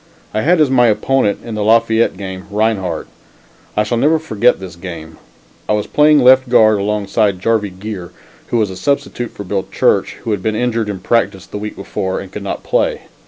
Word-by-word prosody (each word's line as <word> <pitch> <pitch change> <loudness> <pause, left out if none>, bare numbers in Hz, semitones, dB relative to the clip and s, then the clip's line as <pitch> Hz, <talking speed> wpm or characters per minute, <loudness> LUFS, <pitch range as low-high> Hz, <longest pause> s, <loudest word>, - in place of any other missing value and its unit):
I 110 - 0
had 170 +6 +3
as 150 -4 +3
my 125 -2 +5
opponent 110 -1 +1
in 115 - -6
the 105 -1 -2
Lafayette 115 +1 +3
game, 95 -1 -7
Rinehart. 100 -5 -1 0.7
I 105 - +4
shall 115 +2 -1
never 155 +5 +3
forget 125 -6 +1
this 95 -3 -9
game. 85 -3 -9 0.5
I - - +3
was 105 -1 0
playing 150 -1 +4
left 130 0 +5
guard 110 -3 +5
alongside 105 0 0
of - - -15
Jarvie 110 0 0
Geer, 95 -1 -7 0.4
who 120 - 0
was 105 -4 +1
a - - -7
substitute 140 0 -2
for 100 - -9
Bill 95 0 -3
Church, - - +1
who 115 - -2
had 100 -3 -1
been 110 +2 -1
injured 115 -2 -1
in 95 -3 -5
practice 100 -3 0
the 105 - -7
week 105 0 -6
before 95 -1 -3
and 95 - -9
could 105 - -6
not 100 - -5
play. - - 0
105 Hz, 205 wpm, -16 LUFS, 95-120 Hz, 0.7 s, my